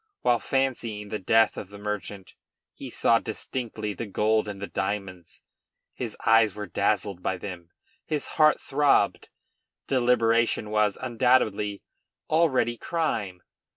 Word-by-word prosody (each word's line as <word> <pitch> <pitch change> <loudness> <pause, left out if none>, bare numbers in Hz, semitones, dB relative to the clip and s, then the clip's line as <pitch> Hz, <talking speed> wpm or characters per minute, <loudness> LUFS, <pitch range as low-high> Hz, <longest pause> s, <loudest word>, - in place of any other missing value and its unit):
While 120 -1 +3
fancying 115 -6 -2
the 105 - -3
death 110 +4 +3
of 95 - -6
the 100 - -11
merchant 105 -2 -5 0.4
he - - -9
saw 115 -1 +3
distinctly 110 -1 -4
the 110 +4 -6
gold 110 +2 +1
and 100 -1 -6
the 100 - -4
diamonds. 95 -4 -5 0.5
His - - -5
eyes 115 -2 +5
were 105 -1 -5
dazzled 100 -2 -1
by 95 - -1
them. 90 -2 -8 0.4
His 150 -3 -2 0.2
heart 155 0 +6
throbbed. 145 +1 +2 0.6
Deliberation 115 -4 +2
was, 105 -2 +2
undoubtedly, 115 -5 +1 0.5
already 145 -7 +2
crime. 105 - -2
110 Hz, 125 wpm, -26 LUFS, 100-120 Hz, 0.6 s, heart